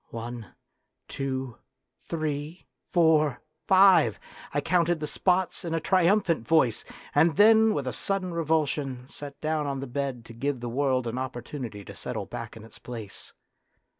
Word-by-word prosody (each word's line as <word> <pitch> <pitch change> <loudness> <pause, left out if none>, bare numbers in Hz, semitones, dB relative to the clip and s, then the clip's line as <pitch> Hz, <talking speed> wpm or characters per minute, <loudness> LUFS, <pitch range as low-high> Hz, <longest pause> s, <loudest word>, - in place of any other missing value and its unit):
One, 115 -1 -6 0.6
two, 130 -3 -4 0.5
three, 155 +1 -3 0.3
four, 155 -6 +3 0.3
five! 190 0 +6 0.3
I - - 0
counted 175 -2 +1
the 150 - -3
spots 185 +3 0
in 165 -2 -2
a - - +1
triumphant 180 - +2
voice, 150 -8 +3 0.3
and 165 -2 +4
then 220 +2 +6
with 140 - -2
a 130 - -3
sudden 190 -3 -2
revulsion 145 -5 -1
sat 140 0 -9
down 155 -1 -1
on 135 -1 -2
the 135 - -4
bed 130 -2 -4
to 115 - -11
give 135 +3 -2
the 120 0 -4
world 130 0 +1
an 120 +2 -3
opportunity 120 -4 -6
to 100 - -10
settle 110 0 -4
back 115 +2 -7
in 110 - -11
its 115 - -14
place. 115 -5 -8
140 Hz, 155 wpm, -27 LUFS, 125-165 Hz, 0.6 s, five